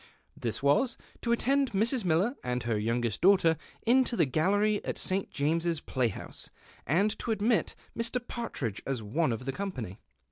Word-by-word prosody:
This 115 +2 -3
was, 190 - +3 0.2
to 235 - -1
attend 270 +1 +2
Mrs. 225 +4 +1
Miller 185 - +2
and 125 0 -2
her 115 -1 0
youngest 115 +1 -1
daughter 180 -3 +5 0.3
into 250 +1 +4
the 170 - +4
gallery 205 +9 +2
at - - -2
the - - -8
St. 190 +1 -1
James's 165 +3 0
play 130 -4 0
house, 110 - -6 0.4
and 195 - +2
to - - -5
admit 220 +1 +1 0.2
Mr. 230 +2 0
Partridge 135 - -4
as 130 -5 -2
one 130 +7 +1
of 115 +2 -4
the 135 - -1
company. 130 - -5
170 Hz, 170 wpm, -30 LUFS, -, 0.4 s, daughter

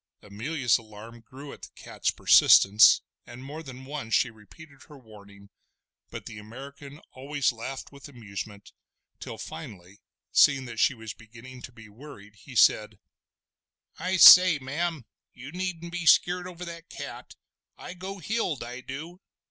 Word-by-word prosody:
Amelia's 120 +5 -1
alarm 110 +1 -13
grew 135 +5 -12
at - - -15
the - - -10
cat's - - -4
persistence, 105 +2 +6 0.3
and 120 +2 -11
more 145 +4 -8
than 130 -3 -11
once 135 -5 -4
she 125 - +1
repeated 135 +6 -17
her 150 - -14
warning; 100 -4 -17 0.6
but - - -9
the 105 -2 -9
American 140 +6 -12
always 140 +1 -2
laughed 130 +3 -8
with 140 0 -13
amusement, 105 -4 -9 0.5
till - - -8
finally, 95 +1 -11 0.3
seeing 140 -3 +4
that 115 -2 -8
she 135 - +2
was 110 -3 -9
beginning 120 +3 -14
to 120 - -10
be 110 -2 -15
worried, 105 -2 -14
he 125 +6 -14
said: 105 -2 +3 1.0
"I 185 +1 -1
say, 180 -2 +9
ma'am, 150 +1 -4 0.3
you 130 +4 -11
needn't 175 -1 -5
be 175 -1 -5
skeered 180 +1 +3
over 180 0 -9
that 170 0 -10
cat. - - -10 0.4
I - - -9
go 190 +2 -8
heeled, 185 - -3
I 125 +2 -8
du!" 155 +8 -9
130 Hz, 150 wpm, -26 LUFS, 110-160 Hz, 1.0 s, say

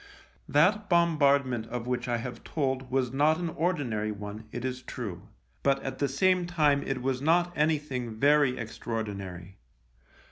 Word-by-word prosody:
That 205 +8 +3
bombardment 140 -9 +3
of 120 0 -4
which 125 0 -2
I 120 -1 +1
have 120 0 -6
told 135 -3 -2
was 130 -1 0
not 150 +3 +3
an 175 -1 -2
ordinary 140 -11 -1
one, 105 +1 -7
it 120 +1 -5
is 130 0 -3
true, 105 -9 -7 0.3
but 135 0 +2
at 135 - -5
the 140 - +2
same 180 +5 +2
time 150 -5 +3
it 130 -3 -3
was 130 -1 -1
not 175 +4 +2
anything 150 -7 -1
very 145 -2 +4
extraordinary. 100 -5 -5
135 Hz, 150 wpm, -28 LUFS, 120-150 Hz, 0.3 s, very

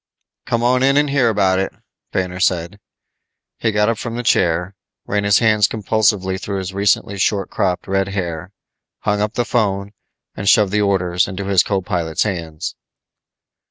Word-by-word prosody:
"Come 115 0 0
on 125 +1 +3
in 135 +1 +3
and 145 -1 +2
hear 135 -4 +3
about 95 -3 +2
it," 95 - -1 0.4
Banner 90 -1 -2
said. 90 +1 0 0.8
He 110 - +1
got 105 0 +2
up 115 -1 0
from 115 -1 -5
the 120 - -3
chair, 90 -3 +1 0.3
ran 100 0 -1
his 100 -1 +5
hands 110 -3 +4
compulsively 105 -3 0
through 100 -1 -3
his 95 0 -4
recently 100 0 +1
short 100 0 0
cropped 90 -2 -1
red 95 0 0
hair, 90 -2 -4 0.5
hung 105 0 0
up 105 +1 -1
the 120 - 0
phone 100 -5 -1 0.4
and 95 - 0
shoved 105 -3 +4
the 105 +1 +1
orders 90 -3 +1
into 95 +1 -5
his 95 -2 +4
co 95 -1 -1
pilot's 80 -3 -1
hands. 85 -7 -4
100 Hz, 170 wpm, -19 LUFS, 95-105 Hz, 0.8 s, his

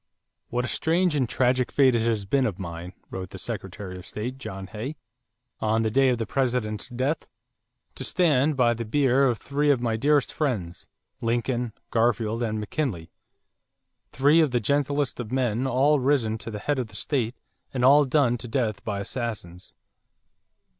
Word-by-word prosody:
"What 125 +1 -1
a - - -3
strange 170 +4 +1
and 130 -5 +1
tragic 125 0 +2
fate 135 -3 +4
it 115 - +2
has 110 -3 0
been 130 +6 +2
of 95 -5 -4
mine," 85 -1 -7 0.2
wrote 95 -1 -5
the 95 - -9
Secretary 95 -2 -6
of 90 - -12
State, 125 +5 -5
John 95 -5 -6
Hay, 110 +9 -6 0.6
on 110 +1 +1
the 110 - 0
day 135 +3 +4
of 125 - +1
the 115 - -2
President's 120 -3 -1
death, 130 +6 -2 0.7
"to - - -5
stand 150 -3 +2
by 120 -2 +4
the 115 0 -4
bier 135 +3 +3
of 120 -3 +1
three 145 +4 0
of 140 -4 +4
my 115 -2 0
dearest 145 +3 +2
friends, 105 - -2 0.3
Lincoln, 120 0 -1 0.2
Garfield, 115 -1 +1
and 110 -2 -1
McKinley, 105 - -3 1.0
three 145 +5 +4
of 155 - +3
the 125 -1 +1
gentlest 140 +2 0
of 120 -2 -5
men, 125 -1 0
all 140 +4 +3
risen 125 -5 +1
to - - -7
the 105 - -5
head 145 +6 -1
of 125 - -2
the 105 - -17
state 120 0 -1 0.4
and 125 -2 0
all 145 +3 +7
done 130 -3 +2
to 120 - -7
death 115 -4 -1
by 100 -2 -3
assassins." 100 -6 -5
120 Hz, 175 wpm, -26 LUFS, 110-135 Hz, 1.0 s, all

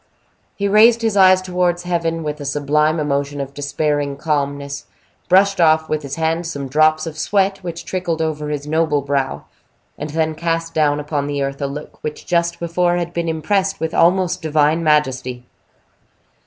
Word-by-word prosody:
He 200 - -1
raised 225 +3 +5
his 220 -2 +1
eyes 185 -1 +6
towards 180 -1 0
heaven, 165 -2 -1
with 150 0 -4
a - - -4
sublime 150 +3 +1
emotion 145 -1 -1
of 140 0 -5
despairing 145 0 -1
calmness, 140 -2 -2 0.4
brushed 195 +1 +4
off 160 -1 +3
with 155 -1 -1
his 140 -1 -5
hand 165 +1 -1
some 140 -4 -5
drops 155 +3 +3
of 155 -1 -7
sweat 195 +3 +1
which 170 -2 -7
trickled 175 -3 -2
over 155 -2 -2
his 145 -1 -3
noble 155 -1 +1
brow, 140 -1 -2 0.5
and 150 - -4
then 160 +1 0
cast 165 +1 -2
down 150 -2 +2
upon 145 -1 -2
the 145 -1 -2
earth 140 +1 -4
a 140 - 0
look 145 +2 -9
which 150 0 -5
just 170 -1 0
before 175 +1 +1
had 170 0 -3
been 170 -1 -2
impressed 195 +5 0
with 160 0 -3
almost 180 +1 +2
divine 155 +1 +2
majesty. 130 -5 0
155 Hz, 170 wpm, -19 LUFS, 145-175 Hz, 0.5 s, eyes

